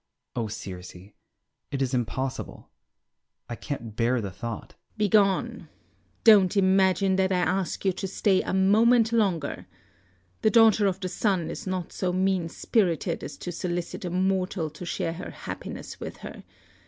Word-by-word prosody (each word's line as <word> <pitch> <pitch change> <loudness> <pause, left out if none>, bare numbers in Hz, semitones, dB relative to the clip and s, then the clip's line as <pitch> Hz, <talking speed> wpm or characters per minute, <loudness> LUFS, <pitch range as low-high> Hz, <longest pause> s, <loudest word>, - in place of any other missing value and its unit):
Oh, 115 -3 -1
Circe, 95 -4 -8 0.7
it 140 - -3
is 135 -1 -1
impossible, 130 +2 -3 0.8
I 120 - -5
can't 115 -5 -6
bear 120 +2 +1
the 100 -4 -4
thought. 110 +4 -6
Circe. - - -28 0.2
Begone; 205 -2 +2 0.5
don't 205 -3 +6
imagine 190 0 +3
that 190 0 +2
I 185 - +2
ask 185 +2 -1
you 190 - +3
to 190 - -4
stay 190 0 +2
a - - -4
moment 225 +5 +4
longer. 190 -10 0 0.7
The - - +4
daughter 220 -1 +5
of 190 -1 -1
the 185 - -2
sun 180 -3 0
is - - -7
not 185 -2 -3
so 185 -1 -1
mean 185 -2 +1
spirited 180 -4 0
as - - -7
to 175 - -5
solicit 175 +1 -4
a 180 - -3
mortal 185 -2 0
to 155 +4 -9
share 165 - -2
her 180 +2 -7
happiness - - -7
with - - -7
her. - - -8
185 Hz, 155 wpm, -26 LUFS, 150-195 Hz, 0.8 s, don't